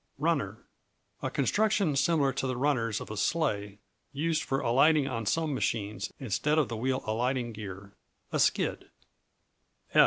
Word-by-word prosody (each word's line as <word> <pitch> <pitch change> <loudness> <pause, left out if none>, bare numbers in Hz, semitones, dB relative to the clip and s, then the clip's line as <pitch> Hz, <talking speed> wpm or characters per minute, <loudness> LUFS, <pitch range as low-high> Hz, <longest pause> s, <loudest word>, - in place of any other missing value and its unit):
Runner - - 0 0.6
A - - -1
construction 205 -7 +2
similar 140 -1 +2
to 135 0 -2
the 130 -1 -2
runners 125 -6 +1
of - - -8
a 110 - -5
sleigh, 105 -10 0 0.3
used 155 +2 0
for 135 -2 -1
alighting 140 +4 +4
on 115 -5 -3
some 160 +6 +1
machines, 105 -6 -2
instead 135 +6 0
of 150 -5 +2
the 115 - -3
wheel 130 +3 -1
alighting 120 +2 0
gear; 100 -2 -8 0.4
a - - 0
skid. - - +1
130 Hz, 145 wpm, -29 LUFS, 110-150 Hz, 0.6 s, alighting